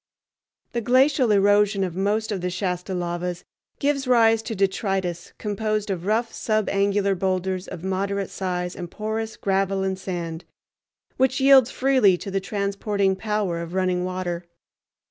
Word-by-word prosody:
The 235 - -1
glacial 255 +1 +3
erosion 205 0 +4
of 180 -3 -3
most 210 +3 0
of 195 -3 -2
the 180 - -1
Shasta 180 0 -3
lavas 175 0 -3 0.3
gives 280 -2 0
rise 225 -2 +4
to 225 0 -5
detritus 190 -3 -1
composed 215 0 -2
of 180 -1 -4
rough 225 +2 0
subangular 200 -2 +1
boulders 185 0 -1
of 175 -2 -8
moderate 195 +1 -2
size 180 -1 -3
and 175 -2 -6
porous 220 +2 -4
gravel 195 0 0
and 190 0 -2
sand, 170 -3 -5 0.7
which 260 +1 +2
yields 265 -2 +6
freely 255 -10 +3
to 195 - -7
the 195 0 -1
transporting 200 0 -1
power 205 -4 -1
of 170 +2 -6
running 185 -1 +1
water. 180 -1 -3
195 Hz, 145 wpm, -24 LUFS, 185-215 Hz, 0.7 s, yields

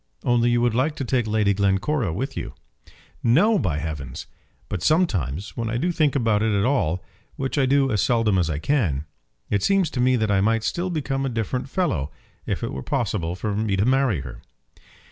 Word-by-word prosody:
"Only 120 -1 +3
you 120 0 +2
would 120 -1 +2
like 140 +6 +1
to 135 - -4
take 120 -2 0
Lady 105 -2 +2
Glencora 100 - +1
with 135 - -3
you." - - -5 0.7
"No, 185 - +4
by 80 -6 -1
heavens! 70 -4 -5 0.4
But 95 - -4
sometimes, 95 - 0
when 115 -1 -2
I 120 - -1
do 175 +8 0
think 155 -4 +1
about 115 -5 +2
it 110 0 +1
at 100 - +1
all, 95 - +1 0.3
which 135 0 -3
I 135 -3 +2
do 135 0 +3
as 105 -3 +1
seldom 115 -5 +2
as 85 -2 +1
I 75 - -1
can, 80 - 0 0.5
it 100 - +2
seems 195 - +2
to 125 - -1
me 130 +1 +4
that 110 -3 0
I 95 -1 +3
might 110 +2 +2
still 175 +11 -1
become 135 -5 -2
a 135 - 0
different 120 +3 -3
fellow 105 - -1 0.4
if - - -2
it - - -3
were 65 - -4
possible 90 - -2
for 105 +3 -3
me 105 -2 0
to 100 +2 +1
marry 130 - +2
her." 65 -3 -9
115 Hz, 205 wpm, -23 LUFS, 95-135 Hz, 0.7 s, No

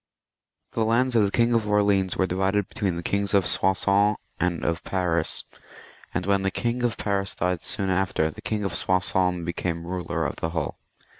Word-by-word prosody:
The 115 - 0
lands 120 +3 +2
of 110 -3 +5
the - - +1
King 120 +3 +2
of 110 -2 +1
Orleans 100 -3 +2
were 95 - +3
divided 95 +2 0
between 100 -9 -2
the 85 - -5
Kings 100 +2 0
of 100 - +4
Soissons 100 +2 +2 0.2
and 90 -1 0
of 85 0 -1
Paris, 90 -4 0 0.7
and 90 +2 -2
when 100 0 +2
the 95 - +1
King 120 +4 -1
of 120 -3 0
Paris 100 -1 -1
died 90 0 -1
soon 95 -2 -2
after, 90 -4 +1
the - - -11
King 105 -1 -2
of 100 -3 -2
Soissons 90 -1 +1
became 85 0 -3
ruler 90 -1 -2
of - - -3
the 80 - -2
whole. 80 -3 -3
95 Hz, 190 wpm, -25 LUFS, 90-105 Hz, 0.7 s, of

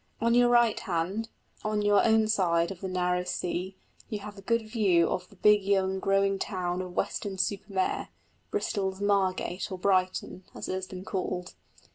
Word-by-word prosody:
On 235 +1 +2
your 245 0 +5
right 240 -2 +4
hand, 190 +4 -2 0.3
on 215 -1 0
your 205 0 +4
own 220 -1 +4
side 170 -5 +2
of 185 - -9
the 190 - -3
narrow 180 -1 0
sea, 180 +1 -3 0.3
you 215 - -2
have 205 0 -8
a 195 - -11
good 230 +3 +1
view 195 -7 +3
of 180 0 -3
the 200 - -18
big 210 +1 +4
young 190 -1 +1
growing 195 0 +2
town 180 -2 -2
of 180 -1 -7
Weston 200 -1 -2
super 200 +2 -1
Mare 190 -1 -1 0.4
Bristol's 195 - -2
Margate 195 -2 0
or 185 - -3
Brighton, 185 0 0
as - - -6
it - - -2
has 185 0 -3
been 185 0 -8
called. 180 -3 -3
195 Hz, 180 wpm, -28 LUFS, 185-210 Hz, 0.4 s, your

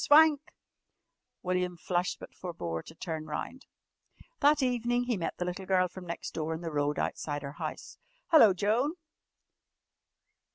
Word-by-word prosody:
"Swank!" 300 -1 +7 1.0
William 180 -1 0
flushed 175 +1 -1
but - - -10
forbore 85 - -4
to 160 - -12
turn 160 -2 -5
round. 205 - -5 0.7
That 295 -1 +4
evening 245 -1 +1
he 245 -1 0
met 170 -4 -3
the 180 - -2
little 180 +1 -4
girl 185 -1 +3
from 180 0 -10
next 170 - -5
door 160 0 -2
in 160 - -7
the 165 -2 -4
road 145 0 0
outside 145 -1 -2
her 140 - -5
house. - - -6 0.3
"Hello, 265 -11 +8
Joan!" 220 - +1
180 Hz, 150 wpm, -30 LUFS, 160-245 Hz, 1.0 s, Hello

